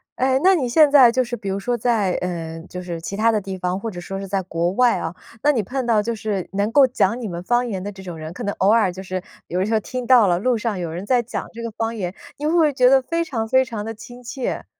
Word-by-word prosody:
哎， 260 +1 +2
那 380 - +6
你 260 -7 -1
现 295 +3 +5
在 260 -5 +8
就 255 +1 +2
是 240 0 -4
比 205 -4 -6
如 195 - -2
说 240 +5 -1
在， 220 -5 +1
呃， 165 -2 -4
就 180 - -6
是 170 -2 -5
其 195 - -5
他 230 +1 +4
的 215 - 0
地 190 -1 -6
方， 180 +1 -2
或 225 - -4
者 180 -4 -7
说 195 +2 -6
是 195 - -6
在 195 0 -1
国 170 -1 -1
外 245 +2 +3
啊， 165 +2 -4 0.3
那 295 - +4
你 240 -7 0
碰 260 +6 -3
到 220 -2 +3
就 235 +2 -2
是 210 -4 -3
能 200 +2 0
够 275 +2 +6
讲 240 -3 +1
你 235 - -4
们 175 -2 -5
方 240 +6 +1
言 190 -5 -3
的 205 - -4
这 190 -1 -12
种 175 -2 -7
人， 155 +1 -7
可 240 - -7
能 205 - -1
偶 190 - +4
尔 220 -5 +3
就 185 +2 -8
是 185 -1 -4 0.2
有 180 +2 -1
时 220 - -1
候 220 - +3
听 250 +3 -5
到 245 -5 +6
了 175 -1 +2
路 245 +5 +1
上 220 -2 -2
有 170 -3 -4
人 175 +4 -5
在 245 +1 +2
讲 235 - -5
这 230 0 -7
个 230 - -4
方 225 +1 -3
言， 180 -5 -3 0.2
你 295 - -5
会 305 - +2
不 345 - +3
会 310 -2 +4
觉 250 -1 +4
得 270 0 +5
非 335 +6 -1
常 230 -9 -3
非 260 +3 +4
常 225 -5 -5
地 225 +1 -5
亲 245 +3 -12
切？ 255 +1 -4
220 Hz, 320 characters per minute, -21 LUFS, 190-250 Hz, 0.3 s, 在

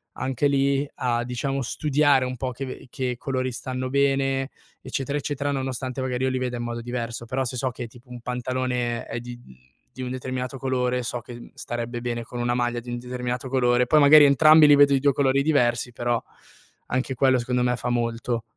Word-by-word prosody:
anche 130 +2 0
lì 140 0 +2
a, 120 -1 0
diciamo, 130 +3 -2
studiare 145 +1 +2
un 125 0 -4
po' 130 +1 -3
che 130 +1 -7
che 125 -1 -3
colori 130 0 -2
stanno 130 +1 -4
bene, 135 0 +1 0.3
eccetera 135 +2 -3
eccetera, 145 0 -2
nonostante 130 -1 -3
magari 130 -1 -2
io - - +2
li 130 - -1
veda 125 -1 -2
in 120 - -4
modo 120 0 -4
diverso. 120 -1 -5
Però 130 +3 -2
se 125 +1 -4
so 130 +2 0
che 120 -1 -6
tipo 120 +2 -18
un 125 -1 -9
pantalone 125 -1 -2
è 120 - -5
di 120 0 -8
mhmm, 65 - -16 0.4
di 130 - -8
un 125 - -4
determinato 130 +1 -4
colore 125 -1 -1
so 120 +1 -3
che 120 0 -11
starebbe 120 0 -5
bene 120 -1 -3
con 120 +1 -8
una 120 0 0
maglia 120 -1 0
di 120 +1 -10
un 120 - -3
determinato 125 +1 -4
colore, 125 -1 +3
poi 155 - +5
magari 145 +1 +8
entrambi 155 +2 +7
li 145 - +8
vedo 140 0 +6
di 135 - +3
2 140 - +4
colori 135 0 +2
diversi, 125 -5 +1
però 120 0 -1 0.7
anche 130 +1 -1
quello 130 0 +3
secondo 125 +1 -1
me 125 0 +1
fa 125 - -3
molto. 115 0 -1
125 Hz, 205 wpm, -24 LUFS, 120-135 Hz, 0.7 s, magari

